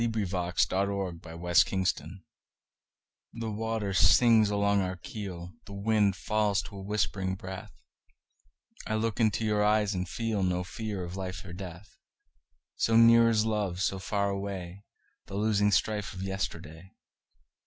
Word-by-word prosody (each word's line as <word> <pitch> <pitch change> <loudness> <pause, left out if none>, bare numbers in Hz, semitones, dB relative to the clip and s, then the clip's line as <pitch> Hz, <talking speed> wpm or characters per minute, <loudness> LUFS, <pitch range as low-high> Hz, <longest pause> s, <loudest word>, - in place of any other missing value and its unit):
By 115 - +2
SophieJewett 95 -2 -1
1502 85 - -12
Armistice 90 +1 +1 1.1
THE 115 -1 -4
WATER 110 -2 -2
sings 110 +5 +5
along 100 -1 +2
our 95 0 -2
keel, 95 -6 -7 0.2
The 100 - -9
wind 100 -1 +2
falls 105 -2 0
to 100 - -10
a - - -7
whispering 95 -1 -1
breath;I 95 -2 -11
look 110 +1 -1
into 110 -1 +2
your 105 -1 +2
eyes 105 0 +2
and 90 -1 -2
feelNo 95 -5 -1
fear 105 -1 -5
of 90 +1 -6
life 95 -1 -5
or 85 - -8
death; 90 +1 -10 0.8
So 115 0 +3
near 115 0 +7
is 110 -1 +2
love, 105 -5 -1
so 95 0 0
far 100 +1 -1
awayThe 100 -2 -5 0.6
losing 105 -1 +2
strife 105 -1 0
of 95 - -5
yesterday. 90 -2 -5
100 Hz, 130 wpm, -29 LUFS, 90-110 Hz, 1.1 s, near